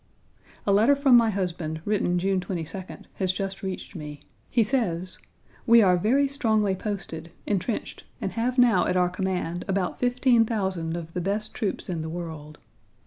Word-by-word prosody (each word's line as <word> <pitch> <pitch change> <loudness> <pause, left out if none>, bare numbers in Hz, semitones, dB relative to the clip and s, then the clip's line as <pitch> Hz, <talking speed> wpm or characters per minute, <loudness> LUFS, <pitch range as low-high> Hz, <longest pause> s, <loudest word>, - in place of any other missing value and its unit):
A 200 - +3
letter 225 +8 +5
from 275 -2 +5
my 230 -2 +6
husband, 175 -5 -3
written 200 -4 +1
June 190 +1 +1
22d, 180 0 -6
has 190 -2 +1
just 195 +1 -4
reached 190 +1 -6
me. 150 -3 -7 0.3
He 230 - +3
says: 185 -7 -1 0.5
"We 230 -1 +7
are 180 -2 +5
very 250 +10 +2
strongly 220 -8 +1
posted, 180 -5 -5
entrenched, 205 +2 -3
and - - -3
have 245 +3 -1
now 235 -8 +5
at 180 - +1
our 180 -1 +3
command 180 -2 -2
about 195 -2 -1
15,000 225 -9 +1
of 165 -1 -8
the 180 - -2
best 205 +4 -1
troops 210 -5 -3
in 170 -3 -3
the 160 - -4
world. 160 -3 -7
190 Hz, 160 wpm, -26 LUFS, 175-225 Hz, 0.5 s, We